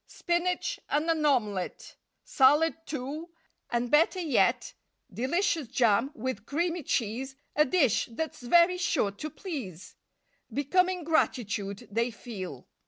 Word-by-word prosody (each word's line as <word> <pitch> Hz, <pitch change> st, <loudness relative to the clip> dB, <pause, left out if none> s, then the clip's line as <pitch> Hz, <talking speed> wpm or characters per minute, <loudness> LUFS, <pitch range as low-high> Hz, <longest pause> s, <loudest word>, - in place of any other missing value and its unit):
Spinach 345 Hz, +1 st, -1 dB
and 300 Hz, +2 st, +1 dB
an 315 Hz, -2 st, 0 dB
omelette, 210 Hz, -9 st, -1 dB, 0.3 s
Salad, 295 Hz, +5 st, +4 dB
too, 295 Hz, +4 st, -5 dB, 0.4 s
and 240 Hz, 0 st, -1 dB
better 325 Hz, +5 st, +4 dB
yet 315 Hz, -8 st, +1 dB, 0.4 s
Delicious 320 Hz, -, 0 dB
jam 235 Hz, -1 st, +2 dB
with 230 Hz, -3 st, -4 dB
creamy 340 Hz, +3 st, -1 dB
cheese— 255 Hz, +1 st, -2 dB, 0.2 s
A 300 Hz, -, +5 dB
dish 270 Hz, -, +2 dB
that's 315 Hz, +5 st, -4 dB
very 345 Hz, +8 st, +4 dB
sure 275 Hz, -, +1 dB
to 250 Hz, +10 st, -6 dB
please! 255 Hz, -, -7 dB, 0.6 s
Becoming 360 Hz, +5 st, +1 dB
gratitude 215 Hz, -, -1 dB
they 230 Hz, +3 st, +1 dB
feel. 190 Hz, -, -8 dB
275 Hz, 115 wpm, -28 LUFS, 230-330 Hz, 0.6 s, A